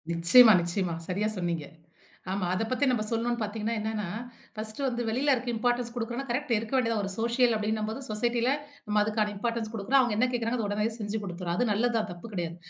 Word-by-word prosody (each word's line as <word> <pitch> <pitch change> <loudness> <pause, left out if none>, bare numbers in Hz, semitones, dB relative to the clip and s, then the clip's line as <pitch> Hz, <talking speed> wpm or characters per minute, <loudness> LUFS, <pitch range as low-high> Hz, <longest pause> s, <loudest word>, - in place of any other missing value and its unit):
நிச்சியமா, 170 +8 +7
நிச்சியமா. 175 0 -1
சரியா 200 +3 0
சொன்னீங்க. 170 -4 -2 0.7
ஆமா, 190 -1 -1
அத 185 - 0
பத்தி 260 +3 +2
நம்ம 240 -4 +1
சொல்லணும்ன்னு 235 +1 -1
பார்த்தீங்கன்னா, 215 +1 -2
என்னன்னா 215 -2 -2 0.5
ஃபர்ஸ்ட்டு 215 +4 -5
வந்து 240 -2 -2
வெளியில 265 +6 +2
இருக்க 250 0 -4
இம்பார்ட்டன்ஸ் 240 +1 0
குடுக்குறோம்னா 240 +3 -3
கரெக்ட் 265 +2 -2
இருக்க 220 +3 -5
வேண்டியதான். 230 -4 +1
ஒரு 195 - -3
சோஷியல் 235 +1 +3
அப்டின்னும்போது 215 +2 -2
சொசைட்டில 235 +3 +1 0.4
நம்ம 210 -1 +2
அதுக்கான 210 0 0
இம்பார்ட்டன்ஸ் 230 +1 -2
குடுக்குறோம். 225 +6 +2
அவங்க 240 -4 0
என்ன 250 +3 +3
கேட்குறாங்க 235 0 -1
அத 215 - -1
உடனேயே 210 +2 0
செஞ்சு 210 +1 -2
குடுத்துறோம். 175 -2 -3
அது 245 - +1
நல்லதுதான் 225 0 +1
தப்பு 175 +6 -9
கிடையாது. 170 -3 -3
220 Hz, 185 wpm, -28 LUFS, 205-240 Hz, 0.7 s, நிச்சியமா